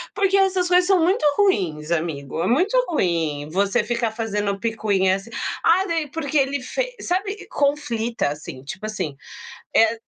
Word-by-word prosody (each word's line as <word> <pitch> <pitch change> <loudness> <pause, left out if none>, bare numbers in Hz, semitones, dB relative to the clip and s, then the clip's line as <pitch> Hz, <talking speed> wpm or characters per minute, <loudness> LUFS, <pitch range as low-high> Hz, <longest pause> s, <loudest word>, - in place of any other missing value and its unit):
Porque 390 -1 +2
essas 380 -2 +2
coisas 360 0 +4
são 385 -2 +4
muito 355 +2 +2
ruins, 170 - +1
amigo. 160 -3 -2
É - - 0
muito 360 - +2
ruim 165 - 0
você 200 +7 +1
ficar 235 0 -1
fazendo 210 -3 -2
picuinha 205 -4 +1
assim, 195 +4 -8 0.3
ah 365 +3 +4
daí 325 -4 -1
porque 300 0 -2
ele 275 0 +1
fe - - -3
sabe? 395 +3 -2
Conflita 245 - 0
assim, 145 -3 -7
tipo 165 +9 -7
assim, 185 -9 -4 0.6
eh, 225 0 +5
230 Hz, 155 wpm, -22 LUFS, -, 0.6 s, eh